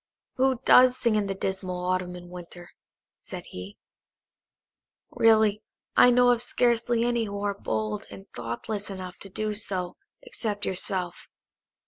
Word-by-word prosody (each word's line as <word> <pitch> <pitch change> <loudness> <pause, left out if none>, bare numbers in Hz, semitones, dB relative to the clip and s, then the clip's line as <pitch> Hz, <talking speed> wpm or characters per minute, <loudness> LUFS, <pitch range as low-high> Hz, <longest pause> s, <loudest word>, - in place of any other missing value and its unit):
"Who 260 -1 +2
does 255 0 +7
sing 235 -2 +1
in 210 -2 +1
the 195 - -2
dismal 190 -1 -3
Autumn 185 -1 -1
and 175 0 -11
Winter?" 175 0 -10 0.5
said - - -8
he. 90 +2 -8 1.3
"Really, 220 -2 +4 0.3
I 250 - +8
know 245 0 +5
of 240 -1 +2
scarcely 240 -1 +2
any 240 -1 +1
who 200 -1 -5
are 205 0 0
bold 110 - -3
and 95 -1 -11
thoughtless 200 - -4
enough 185 -2 -7
to 195 - -9
do 215 +2 -2
so 185 -4 -4 0.3
except 215 - -3
yourself. 185 -1 -3
200 Hz, 140 wpm, -27 LUFS, 180-230 Hz, 1.3 s, I